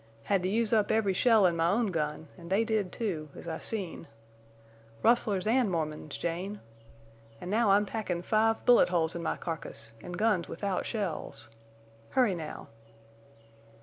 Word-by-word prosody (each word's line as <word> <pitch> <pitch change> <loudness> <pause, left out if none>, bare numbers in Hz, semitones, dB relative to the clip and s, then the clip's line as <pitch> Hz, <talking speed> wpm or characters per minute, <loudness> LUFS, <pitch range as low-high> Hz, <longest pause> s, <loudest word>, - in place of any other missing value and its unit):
Had 195 - +1
to 185 - -1
use 225 +2 +1
up 215 -2 +3
every 210 -3 +2
shell 220 0 +4
in 175 -2 +3
my 165 0 +2
own 210 +1 +1
gun, 155 -1 -2
an' 170 -1 -11
they 200 +4 +3
did, 215 -5 -1
too, 170 -10 -3
as - - -10
I 160 -1 -3
seen. 190 -7 -3 1.0
Rustlers 215 -5 +3
an' 235 0 +3
Mormons, 155 -4 -3
Jane! 185 +5 -3 0.8
An' 180 - -6
now 220 0 +3
I'm 200 +1 +5
packin' 190 -5 -3
five 225 +2 +1
bullet 245 -6 +6
holes 165 -2 +1
in 170 - -5
my 165 - -2
carcass, 150 -9 -6
an' 175 - -8
guns 185 -2 +1
without 195 +2 -2
shells. 200 - -4 0.6
Hurry, 245 -7 +3
now." 160 -3 -7
190 Hz, 160 wpm, -30 LUFS, 170-220 Hz, 1.0 s, bullet